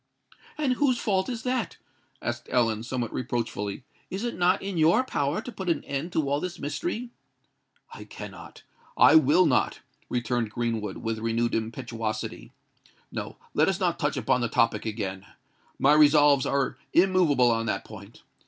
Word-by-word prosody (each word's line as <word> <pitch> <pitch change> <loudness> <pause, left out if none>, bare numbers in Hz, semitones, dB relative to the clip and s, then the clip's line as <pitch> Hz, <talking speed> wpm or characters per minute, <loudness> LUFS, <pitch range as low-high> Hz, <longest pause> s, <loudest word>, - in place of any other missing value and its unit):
"And 290 -4 +1
whose 255 -1 +2
fault 190 -3 0
is 235 -3 -4
that?" 250 -2 -2 0.5
asked 120 0 -4
Ellen, 115 -4 +1
somewhat 120 -1 -3
reproachfully. 115 -4 -3 0.3
"Is 195 +4 -4
it 240 - -2
not 180 +2 +3
in 195 -3 -3
your 165 +10 +4
power 145 - -1
to 245 - -7
put 190 -4 -5
an 170 - 0
end 140 +5 -4
to 155 -3 0
all 140 +1 +1
this 180 +2 -5
mystery?" 240 - -4 0.8
"I - - -9
cannot—I - - -1
will 160 +5 +5
not," - - +1 0.3
returned 120 -2 -1
Greenwood, 115 -3 -3
with 115 -1 -3
renewed 115 +1 0
impetuosity. 115 - -4 0.6
"No—let - - -2
us - - -1
not - - 0
touch - - 0
upon 125 - +1
the 120 - 0
topic 115 0 +1
again. 95 -3 -4 0.5
My 140 +2 +4
resolves 145 -2 +5
are 140 -1 -1
immoveable 170 -9 +4
on 115 0 -1
that 95 -3 -2
point. 105 0 -12
135 Hz, 155 wpm, -26 LUFS, 115-180 Hz, 0.8 s, will